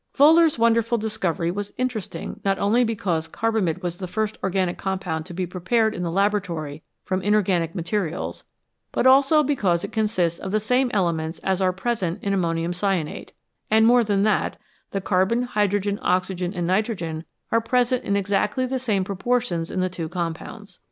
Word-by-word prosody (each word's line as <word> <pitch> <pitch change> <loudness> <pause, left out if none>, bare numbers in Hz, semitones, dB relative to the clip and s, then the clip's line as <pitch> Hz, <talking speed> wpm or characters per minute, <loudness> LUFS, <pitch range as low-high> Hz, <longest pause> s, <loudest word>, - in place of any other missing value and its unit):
Wohlers 315 +2 +6
wonderful 230 0 +3
discovery 190 -6 -1
was 205 +2 -5
interesting 230 -9 -4
not 195 -1 +1
only 215 +6 +3
because 185 -8 -1
carbamide 190 -3 -1
was 175 -1 -3
the 185 - -5
first 215 +4 -2
organic 185 -2 0
compound 185 -5 -3
to 175 - -8
be 185 0 -1
prepared 215 +6 0
in 180 - -5
the 175 - -1
laboratory 170 -6 -1 0.2
from 185 -1 -1
inorganic 190 -5 +1
materials, 180 -1 -3 0.5
but - - 0
also 275 +4 +6
because 200 - +1
it - - -5
consists 185 -7 0
of 190 - -5
the 215 - +2
same 250 +4 +1
elements 165 -4 0
as 190 0 0
are 185 -1 +3
present 190 -3 -2
in 200 - 0
ammonium 170 -2 0
cyanate, 180 -4 -2 0.4
and, 220 +1 +5
more 240 +1 +6
than 200 -2 +1
that, 215 0 +1 0.3
the 195 - -3
carbon, 190 +6 +1
hydrogen, 205 -3 0
oxygen, 180 0 0
and 175 -3 -3
nitrogen 180 -4 -1 0.3
are 230 - +3
present 250 +1 +1
in 200 - 0
exactly 205 +5 0
the 260 +1 -2
same 215 -6 0
proportions 195 -3 -1
in 185 - -2
the 185 - +1
two 170 -3 -5
compounds. 170 -2 -6
195 Hz, 170 wpm, -23 LUFS, 175-225 Hz, 0.5 s, Wohlers